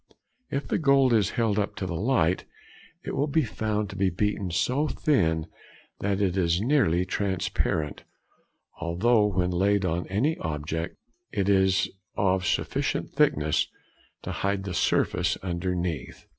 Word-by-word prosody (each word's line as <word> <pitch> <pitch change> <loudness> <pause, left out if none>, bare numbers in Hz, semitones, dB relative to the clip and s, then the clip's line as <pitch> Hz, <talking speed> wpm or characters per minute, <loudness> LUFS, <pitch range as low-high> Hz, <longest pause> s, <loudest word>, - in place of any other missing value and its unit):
If 140 +1 -3
the - - 0
gold 140 -4 +4
is 105 -3 +3
held 110 -3 +2
up 100 - -2
to 95 - -4
the 90 - -3
light, 95 -3 +1 0.6
it - - -4
will 145 - +1
be 155 +2 +2
found 105 -2 -2
to - - -8
be 95 0 +2
beaten 100 +1 -1
so 130 - +1
thin 85 - +1 0.5
that 100 0 0
it 95 -3 +1
is 85 -2 +2
nearly 105 - +2
transparent, 95 -6 -1 0.8
although 105 +6 +2
when 90 -3 0
laid 100 +2 +2
on 85 0 -1
any 130 +12 0
object 80 +2 -3 0.3
it 100 -2 -1
is 95 -1 +3 0.3
of 95 -2 +2
sufficient - - -1
thickness 75 0 +2 0.6
to - - -4
hide 100 0 -1
the 95 -2 -4
surface - - +1
underneath. 85 -5 -3
95 Hz, 145 wpm, -26 LUFS, 85-105 Hz, 0.8 s, gold